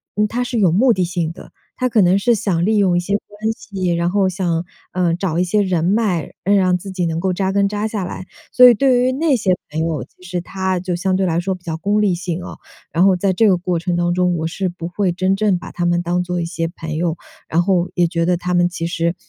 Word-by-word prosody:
嗯， 210 0 +2
他 240 +4 -2
是 245 -1 -3
有 190 -6 +3
目 240 +9 +4
的 185 -5 +1
性 170 -2 -2
的。 - - -13 0.3
他 255 - +3
可 225 -3 +3
能 185 +1 +4
是 235 +3 +3
想 190 -6 0
利 220 +2 +2
用 190 -4 +3
一 - - +3
些 175 +3 -3
关 210 +2 -3
系， 190 -5 -3
然 170 +1 0
后 195 -1 +2
想， 175 -2 -1 0.3
呃， 175 -2 +1
找 175 -2 -2
一 180 - +2
些 210 +4 +1
人 185 -4 0
脉， 195 -4 +1
让 185 -2 +3
自 195 +2 -8
己 185 -2 -2
能 165 0 -2
够 190 0 0
扎 190 +1 -1
根 200 0 +2
扎 210 +1 -2
下 210 -3 -3
来。 185 +1 -7 0.2
所 250 0 +8
以 245 - +8
对 255 +2 +3
于 255 +1 +2
那 305 +2 +1
些 205 -7 +2 0.2
朋 155 - -3
友， 160 -2 -1
其 - - -21
实 180 -1 -4
他 190 +1 -2
就 185 0 -3
相 185 +2 0
对 190 0 +1
来 170 -2 +1
说 190 +2 -2
比 180 - -17
较 160 -2 -4
功 205 +5 +1
利 200 -3 +2
性 175 0 -4
哦， - - -8 0.3
然 175 +3 +3
后 195 -1 +5
在 190 +2 +1
这 215 +4 +3
个 190 - +5
过 175 -1 -2
程 175 +1 -2
当 175 0 +1
中， 180 0 +1
我 160 -1 -2
是 185 +4 -2
不 170 -1 -6
会 185 0 0
真 185 +2 0
正 205 -3 +2
把 - - -9
他 175 - -2
们 175 0 +2
当 175 +1 0
做 180 0 -2
一 - - -2
些 165 0 -3
朋 160 -2 -6
友， 165 -1 0 0.3
然 170 +2 +1
后 180 -1 +1
也 175 - +3
觉 170 0 -1
得 180 +1 +2
他 180 +1 -3
们 175 0 +3
其 175 -1 -4
实 170 0 -1
180 Hz, 290 characters per minute, -19 LUFS, 175-200 Hz, 0.3 s, 所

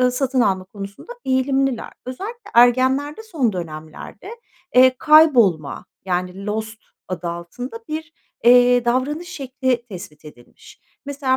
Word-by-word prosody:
eee, 250 0 +4
satın 260 0 0
alma 190 -4 +1
konusunda 200 - -9
eğilimliler. 265 -1 0 0.2
Özellikle 420 - -7
ergenlerde 260 - +3
son 295 - -1
dönemlerde, 160 - -8 0.4
eee, 255 0 +6
kaybolma 245 - +4 0.2
yani 180 +2 -3
lost 220 +1 -4 0.3
adı 180 -1 -4
altında 225 +8 -7
bir, 315 +1 -5 0.3
eee, 245 0 +6
davranış 285 +8 -1
şekli 260 -5 -2
tespit 160 -6 -10
edilmiş. 120 -5 -16 0.3
Mesela 275 -2 0
250 Hz, 115 wpm, -21 LUFS, 195-275 Hz, 0.4 s, eee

